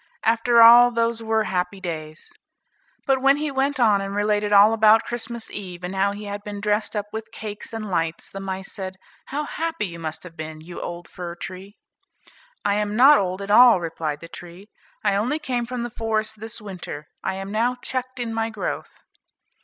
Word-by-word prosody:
after 230 Hz, +1 st, +5 dB
all 240 Hz, +1 st, +9 dB
those 230 Hz, -1 st, 0 dB
were 220 Hz, -1 st, +1 dB
happy 185 Hz, 0 st, -2 dB
days." 155 Hz, -4 st, -6 dB, 0.7 s
But 265 Hz, -1 st, +2 dB
when 275 Hz, +1 st, +5 dB
he 300 Hz, 0 st, -2 dB
went 275 Hz, +1 st, 0 dB
on 210 Hz, -4 st, +4 dB
and 195 Hz, 0 st, -4 dB
related 210 Hz, 0 st, +1 dB
all 205 Hz, +2 st, +7 dB
about 220 Hz, 0 st, +5 dB
Christmas 235 Hz, -1 st, -5 dB
eve, 180 Hz, -3 st, -7 dB
and 180 Hz, +2 st, -4 dB
how 195 Hz, +1 st, +2 dB
he 205 Hz, +1 st, -7 dB
had 205 Hz, 0 st, -6 dB
been 205 Hz, -1 st, -6 dB
dressed 210 Hz, +2 st, 0 dB
up 205 Hz, -1 st, -1 dB
with 220 Hz, 0 st, -6 dB
cakes 210 Hz, -1 st, -7 dB
and 225 Hz, -2 st, -5 dB
lights, 165 Hz, -1 st, -1 dB
the 195 Hz, -, -8 dB
mice 190 Hz, 0 st, -5 dB
said, 190 Hz, -2 st, -6 dB, 0.3 s
"How 290 Hz, +3 st, -3 dB
happy 325 Hz, -3 st, -3 dB
you 170 Hz, -3 st, -7 dB
must 160 Hz, -1 st, -5 dB
have 175 Hz, -2 st, -11 dB
been, 155 Hz, -1 st, -7 dB
you 170 Hz, +3 st, -9 dB
old 175 Hz, 0 st, -6 dB
fir 175 Hz, -1 st, -7 dB
tree." 190 Hz, +3 st, -9 dB, 0.9 s
"I 200 Hz, -, +3 dB
am 210 Hz, 0 st, -1 dB
not 275 Hz, +5 st, +7 dB
old 185 Hz, 0 st, -2 dB
at 200 Hz, -, -4 dB
all," 240 Hz, -2 st, +8 dB
replied 160 Hz, -3 st, -4 dB
the 165 Hz, -, -9 dB
tree, 175 Hz, +4 st, -12 dB, 0.3 s
"I 205 Hz, -2 st, +2 dB
only 230 Hz, +9 st, 0 dB
came 250 Hz, -6 st, -2 dB
from 250 Hz, -1 st, -4 dB
the 240 Hz, -, -5 dB
forest 220 Hz, -1 st, -2 dB
this 225 Hz, +2 st, -6 dB
winter, 180 Hz, -8 st, -7 dB, 0.2 s
I 190 Hz, -, -1 dB
am 195 Hz, +1 st, -6 dB
now 235 Hz, +4 st, +1 dB
checked 255 Hz, 0 st, -5 dB
in 235 Hz, -2 st, -3 dB
my 225 Hz, 0 st, -1 dB
growth." 215 Hz, -2 st, -5 dB
210 Hz, 200 wpm, -23 LUFS, 185-235 Hz, 0.9 s, all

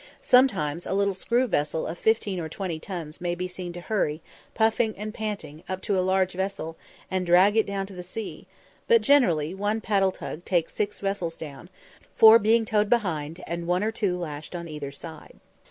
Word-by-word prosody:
Sometimes 185 Hz, -, +3 dB
a -, -, -1 dB
little 200 Hz, 0 st, +2 dB
screw 235 Hz, +7 st, +1 dB
vessel 160 Hz, -7 st, -1 dB
of 165 Hz, -, -4 dB
fifteen 205 Hz, -1 st, +1 dB
or 160 Hz, -2 st, -4 dB
twenty 170 Hz, -2 st, -4 dB
tons 165 Hz, -4 st, -7 dB
may 175 Hz, -1 st, -1 dB
be 180 Hz, +1 st, -3 dB
seen 180 Hz, -1 st, -6 dB
to 175 Hz, -, -7 dB
hurry, 175 Hz, -6 st, -1 dB, 0.4 s
puffing 220 Hz, 0 st, +2 dB
and 210 Hz, +1 st, -5 dB
panting, 200 Hz, -10 st, -5 dB
up 185 Hz, 0 st, -2 dB
to 200 Hz, -, 0 dB
a 185 Hz, -, +2 dB
large 190 Hz, 0 st, +1 dB
vessel 190 Hz, -3 st, -3 dB, 0.4 s
and 185 Hz, -1 st, 0 dB
drag 180 Hz, +4 st, +5 dB
it 220 Hz, -, +3 dB
down 200 Hz, -1 st, -2 dB
to 195 Hz, -, -12 dB
the 180 Hz, -, -7 dB
sea; 200 Hz, +4 st, -7 dB, 0.4 s
but 465 Hz, -1 st, +5 dB
generally 180 Hz, -, +3 dB
one 205 Hz, +3 st, -1 dB
paddle 195 Hz, -3 st, +2 dB
tug 175 Hz, -2 st, -7 dB
takes 175 Hz, -4 st, 0 dB
six 205 Hz, -1 st, -2 dB
vessels 195 Hz, -4 st, -2 dB
down, 150 Hz, +2 st, -9 dB, 0.5 s
four 220 Hz, +1 st, +9 dB
being 225 Hz, +2 st, +3 dB
towed 210 Hz, -2 st, +1 dB
behind 170 Hz, -8 st, -1 dB
and 170 Hz, 0 st, -4 dB
one 180 Hz, +2 st, +1 dB
or 220 Hz, -, 0 dB
two 200 Hz, -5 st, -1 dB
lashed 155 Hz, -1 st, -6 dB
on 170 Hz, -1 st, -5 dB
either 150 Hz, -3 st, -6 dB
side. 160 Hz, +2 st, -11 dB
185 Hz, 195 wpm, -26 LUFS, 170-210 Hz, 0.5 s, four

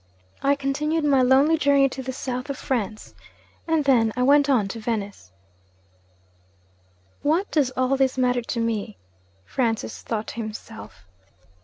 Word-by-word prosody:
I 280 Hz, +1 st, +3 dB
continued 300 Hz, +3 st, -1 dB
my 275 Hz, -3 st, +4 dB
lonely 275 Hz, +5 st, +4 dB
journey 280 Hz, -2 st, +4 dB
to 265 Hz, -, -6 dB
the 260 Hz, 0 st, -4 dB
South 255 Hz, +1 st, -5 dB
of 280 Hz, -, -3 dB
France. 215 Hz, -4 st, -3 dB, 0.5 s
And 320 Hz, -3 st, +1 dB
then 235 Hz, -5 st, +4 dB
I 250 Hz, -, 0 dB
went 285 Hz, +2 st, +4 dB
on 235 Hz, -8 st, +3 dB
to 225 Hz, -, -6 dB
Venice.' 205 Hz, -, -4 dB, 1.9 s
'What 330 Hz, +7 st, 0 dB
does 290 Hz, -5 st, +2 dB
all 255 Hz, +1 st, +2 dB
this 265 Hz, -1 st, +1 dB
matter 250 Hz, -1 st, +2 dB
to 235 Hz, 0 st, -4 dB
me?' 220 Hz, -, -2 dB, 0.5 s
Francis 225 Hz, -, -2 dB
thought 220 Hz, -2 st, -3 dB
to -, -, -8 dB
himself. 220 Hz, -, -8 dB
255 Hz, 145 wpm, -24 LUFS, 225-280 Hz, 1.9 s, my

